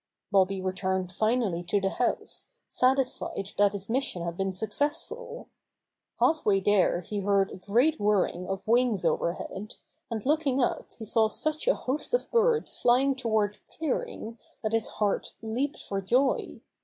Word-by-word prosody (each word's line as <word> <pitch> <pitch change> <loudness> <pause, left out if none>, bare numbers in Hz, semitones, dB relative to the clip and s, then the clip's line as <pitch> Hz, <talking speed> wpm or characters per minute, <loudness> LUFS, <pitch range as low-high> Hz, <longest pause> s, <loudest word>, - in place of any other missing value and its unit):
Bobby 195 0 +3
returned 185 -1 -1
finally 215 -3 0
to 205 - +1
the 195 0 0
house, 245 - -1 0.2
satis 260 0 +2
fied 195 0 -5
that 205 0 +5
his 200 -1 -3
mission 240 -7 -1
had 170 0 -3
been 195 +1 -1
successful. 290 - -3 0.7
Half 315 -1 +3
way 195 -2 +3
there 190 -3 +3
he 205 +4 -4
heard 200 0 +2
a - - -7
great 245 +12 +2
whirring 200 -3 +1
of 195 +1 -4
wings 235 -3 +2
overhead, 190 +4 -2 0.3
and 225 -3 -4
looking 290 -2 +2
up 245 - 0
he 225 - -7
saw 220 +1 +3
sucH 310 - -1
a - - +5
host 290 - -1
of - - -3
birds 465 0 +2
flying 260 +3 +4
toward 220 -5 0
the - - -18
clearing 240 -6 -3 0.2
that 215 0 -1
his 225 -1 +1
heart 205 -2 -1
leaped 240 +6 -2
for 195 -1 -3
joy. 255 +8 +1
220 Hz, 160 wpm, -28 LUFS, 195-260 Hz, 0.7 s, that